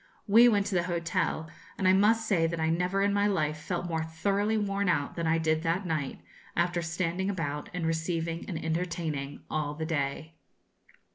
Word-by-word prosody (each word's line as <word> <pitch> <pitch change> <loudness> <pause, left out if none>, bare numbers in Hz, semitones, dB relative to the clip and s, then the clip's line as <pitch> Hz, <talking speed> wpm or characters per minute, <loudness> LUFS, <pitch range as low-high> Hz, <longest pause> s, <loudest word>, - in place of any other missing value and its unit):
We 230 +4 +7
went 205 -3 +2
to 200 - -3
the 175 -1 +2
hotel; 170 -2 -1 0.3
and 190 - +1
I 185 - +6
must 220 +3 +4
say 170 -6 +3
that 170 0 -3
I 160 0 +1
never 180 +4 +1
in 200 0 +2
my 205 0 +3
life 155 -6 0
felt 175 +3 -3
more 160 -2 -1
thoroughly 200 +7 0
worn 200 -2 0
out 145 -5 0
than 170 -1 -1
I 160 +1 +3
did 160 -1 +1
that 170 +4 0
night, 155 -5 -2 0.3
after 175 0 +1
standing 170 +3 -1
about 150 -6 -3
and 180 -1 -3
receiving 165 0 -1
and 175 - -3
entertaining 160 -4 -3
all 150 -1 -2
the 160 +1 -3
day. 155 0 -2
170 Hz, 190 wpm, -29 LUFS, 160-190 Hz, 0.3 s, We